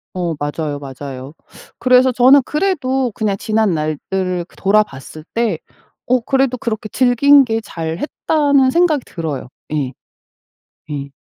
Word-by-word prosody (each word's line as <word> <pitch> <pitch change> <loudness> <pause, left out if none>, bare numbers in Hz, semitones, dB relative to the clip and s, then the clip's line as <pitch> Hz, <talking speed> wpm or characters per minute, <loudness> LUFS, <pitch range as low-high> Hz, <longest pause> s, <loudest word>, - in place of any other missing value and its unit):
어 175 -3 -2
맞아요, 145 0 -3
맞아요. 135 0 -8 0.5
그래서 255 0 +4
저는 255 +3 +6
그래도 270 - 0
그냥 205 -2 0
지난날들을 185 -3 -1
그 - - -24
돌아봤을 190 -7 -1
때 225 -8 0 0.5
어 255 +1 +2
그래도 265 +1 0
그렇게 220 -3 -4
즐긴 265 +3 +5
게 225 -1 -1
잘했다는 265 - 0
생각이 320 -5 +2
들어요. 155 -7 -5 0.2
예. 140 -4 -2 1.0
예. 140 -1 -4
215 Hz, 265 characters per minute, -18 LUFS, 155-260 Hz, 1.0 s, 저는